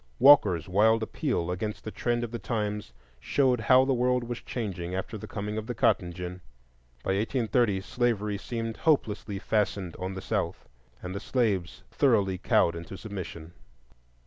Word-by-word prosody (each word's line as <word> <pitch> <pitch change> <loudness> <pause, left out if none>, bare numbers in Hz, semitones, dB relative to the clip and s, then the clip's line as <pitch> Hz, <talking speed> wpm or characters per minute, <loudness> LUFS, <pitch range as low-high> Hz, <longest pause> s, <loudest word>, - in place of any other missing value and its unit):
Walker's 105 - +6
wild 110 +4 +3
appeal 110 - -1
against 105 +4 -4
the 110 - -5
trend 120 +1 -1
of 115 - -4
the 120 - -4
times 105 - -3 0.3
showed 130 - +2
how 130 +3 +5
the 135 - +2
world 125 0 +2
was 120 0 -5
changing 95 -7 -4
after 95 +4 -4
the 105 - -7
coming 105 +1 -3
of 110 - -8
the 120 - -3
cotton 90 -2 +2
gin. 90 +1 -7 0.6
By - - -3
1830 110 0 +1
slavery 105 -2 -1
seemed 115 0 -4
hopelessly 110 - +1
fastened 100 -3 -1
on 95 +1 -4
the - - -4
South, - - -2 0.4
and 90 +1 -5
the 100 - -3
slaves 100 -8 -1
thoroughly 100 -9 +2
cowed 85 - +3
into 85 +3 -7
submission. 90 -6 -7
105 Hz, 160 wpm, -28 LUFS, 95-120 Hz, 0.6 s, Walker's